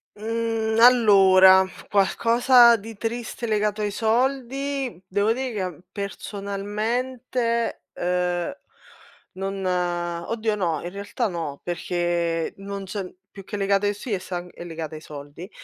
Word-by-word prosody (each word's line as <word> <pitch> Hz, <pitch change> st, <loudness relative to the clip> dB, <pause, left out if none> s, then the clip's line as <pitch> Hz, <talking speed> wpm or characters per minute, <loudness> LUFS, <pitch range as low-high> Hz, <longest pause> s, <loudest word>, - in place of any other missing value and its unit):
Mhmm, 225 Hz, 0 st, -1 dB
allora, 195 Hz, -6 st, +7 dB, 0.2 s
qualcosa 235 Hz, +5 st, +5 dB
di 225 Hz, +2 st, -10 dB
triste 235 Hz, +1 st, -4 dB
legato 210 Hz, -1 st, 0 dB
ai 210 Hz, -, 0 dB
soldi, 260 Hz, +1 st, -1 dB
devo 205 Hz, +4 st, +1 dB
dire 260 Hz, +1 st, -3 dB
che 185 Hz, -6 st, -4 dB
personalmente, 220 Hz, +5 st, -3 dB
eh, 180 Hz, +5 st, -1 dB, 0.8 s
non 195 Hz, 0 st, -4 dB
oddio, 180 Hz, +4 st, -1 dB
no, 170 Hz, -7 st, -1 dB
in 175 Hz, -, -5 dB
realtà 200 Hz, +4 st, -3 dB
no, 165 Hz, -7 st, -5 dB
perché 175 Hz, -1 st, -1 dB
non 200 Hz, 0 st, -6 dB
c'è 190 Hz, -1 st, -5 dB, 0.2 s
più 195 Hz, -, -11 dB
che 205 Hz, +2 st, -6 dB
legata 200 Hz, 0 st, +2 dB
ai 205 Hz, -, 0 dB
si 220 Hz, +4 st, -7 dB
e 200 Hz, -, 0 dB
sa 180 Hz, -1 st, -5 dB
è -, -, -9 dB
legata 165 Hz, -2 st, -6 dB
ai 155 Hz, -, -8 dB
soldi. 150 Hz, +4 st, -10 dB
200 Hz, 125 wpm, -24 LUFS, 180-230 Hz, 0.8 s, allora